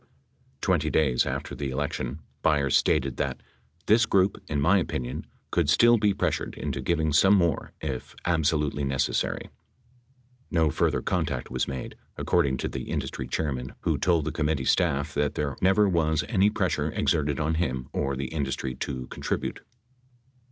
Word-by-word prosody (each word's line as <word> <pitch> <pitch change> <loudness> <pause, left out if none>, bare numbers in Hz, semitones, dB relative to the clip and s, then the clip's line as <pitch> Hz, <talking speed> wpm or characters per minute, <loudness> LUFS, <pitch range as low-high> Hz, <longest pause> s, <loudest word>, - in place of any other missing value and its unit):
Twenty - - +1
days 65 -6 +2
after - - -3
the 70 -2 -3
elec 70 +2 -2
tion, 65 +5 -4 0.2
Byers 70 -3 +2
stated 65 -1 +2
that: - - -2 0.4
"This 110 +1 +4
group, 95 0 +2
in 75 - -1
my 90 +8 +4
opinion, 65 -7 -4 0.2
could 85 -4 +1
still 120 +8 +6
be 105 -1 +3
pressured - - -1
into 70 -2 -3
giving 80 +2 0
some 95 +6 +6
more 85 -5 +1
if 65 -5 -5
absolutely 75 -4 +1
necessary." 70 -1 -1 1.0
No 80 -3 +2
further - - +1
contact 60 - -2
was 65 0 -1
made, 65 -2 -5 0.2
according 65 -2 +1
to - - -2
the - - -6
industry - - -3
chairman 65 -5 -3
who - - +1
told 85 -4 +2
the 80 - -1
committee 75 -4 -1
staff 75 -5 +1
that 75 0 0
there 70 -2 -2
never 95 +3 +4
was 80 -4 +1
any 100 -3 +3
pressure - - 0
exerted 70 -2 0
on 80 +1 0
him 65 -6 -1
or 70 0 -1
the 70 +1 -4
industry 70 -4 -2
to 65 -2 -4
contribute. - - -3
75 Hz, 160 wpm, -27 LUFS, 70-85 Hz, 1.0 s, still